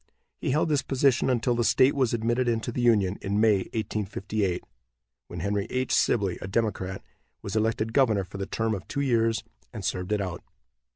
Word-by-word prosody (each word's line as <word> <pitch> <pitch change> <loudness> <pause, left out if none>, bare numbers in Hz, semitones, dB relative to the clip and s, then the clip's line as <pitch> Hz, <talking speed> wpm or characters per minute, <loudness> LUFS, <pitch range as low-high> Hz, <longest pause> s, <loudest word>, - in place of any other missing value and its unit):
He - - -2
held 150 +5 +2
this 145 -2 +2
position 135 -1 +2
until 125 0 +1
the 120 0 +1
state 130 +4 +4
was 130 -4 +1
admitted 120 +2 0
into 115 0 0
the 125 - -2
Union, 105 -5 +3
in 100 +1 -1
May, 110 -2 +5 0.2
1858, 105 -3 -2 0.6
when 85 -1 -6
Henry 100 +1 -1
H. 130 0 -1
Sibley, 100 -6 +2
a - - -5
Democrat, 95 -3 -2 0.4
was 100 +1 -5
elected 110 0 0
governor 115 -8 +3
for 95 +2 -9
the 95 - -3
term 115 0 -1
of 95 -2 -5
two 140 - -2
years, 115 -4 +1 0.3
and 105 -6 -6
served 90 +1 -2
it 105 - +2
out. 90 -3 -4
110 Hz, 185 wpm, -27 LUFS, 100-120 Hz, 0.6 s, May